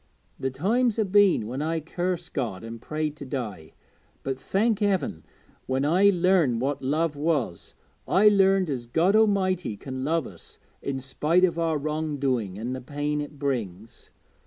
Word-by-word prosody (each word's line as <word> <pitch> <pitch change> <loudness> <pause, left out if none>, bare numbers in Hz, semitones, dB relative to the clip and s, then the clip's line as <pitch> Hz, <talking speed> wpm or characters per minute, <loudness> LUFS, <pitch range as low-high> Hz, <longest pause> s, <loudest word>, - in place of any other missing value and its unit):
The 135 - -1
times 220 - +1
ha' 220 - +3
been 195 - +4
when 130 +6 -4
I 165 +2 -1
cursed 175 +2 -3
God 115 -9 -3
an' 115 0 -7
prayed 155 +3 -3
to - - -8
die, 110 - -5 0.5
but, 135 -1 -3
thank 215 - +1
Heaven, 195 - 0 0.4
when 130 +2 0
I 185 +7 +5
learned 175 -9 +3
what 135 +2 -1
love 150 +3 0
was, 145 - -2 0.3
I 200 +3 +5
learned 195 -4 +4
as 120 -3 -4
God 170 - +2
A'mighty 185 - +2
can 130 -1 -5
love 160 0 0
us 85 -4 -12 0.2
in 140 -1 -3
spite 150 +7 +2
o' 170 -2 -2
our 165 -2 +1
wrong 155 0 -2
doing, 120 -9 -1
an' 120 +4 -4
the 130 - -5
pain 145 +3 -2
it 145 0 -8
brings. 115 -7 -4
150 Hz, 165 wpm, -26 LUFS, 130-180 Hz, 0.5 s, I